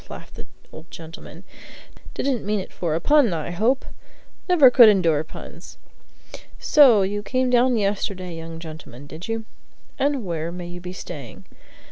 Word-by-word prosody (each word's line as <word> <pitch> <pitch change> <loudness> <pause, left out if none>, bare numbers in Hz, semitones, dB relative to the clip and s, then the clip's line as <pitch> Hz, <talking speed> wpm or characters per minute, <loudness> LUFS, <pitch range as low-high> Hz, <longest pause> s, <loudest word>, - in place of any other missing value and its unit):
laughed - - -11
the - - -11 0.2
old 160 +2 -13
gentleman. 165 +2 -11 0.7
"Didn't 265 -5 -1
mean 210 +1 -1
it 190 - -8
for 165 -3 -2
a - - 0
pun, 290 - +3
I 160 +1 -4
hope? 230 +9 0 0.6
Never 300 -8 +7
could 240 -3 +8
endure 165 -7 +2
puns! 155 - -12 0.8
So 255 -10 +5
you 205 +2 -2
came 255 +3 -1
down 245 0 +3
yesterday, 195 -3 -2
young 165 0 -8
gentleman, 155 -5 -10
did 155 +4 -9
you? 225 -1 -3 0.5
And 275 -4 0
where 165 -1 -3
may 175 0 -7
you 175 0 -8
be 180 0 -7
staying?" 150 -9 -9
190 Hz, 155 wpm, -22 LUFS, 165-240 Hz, 0.8 s, could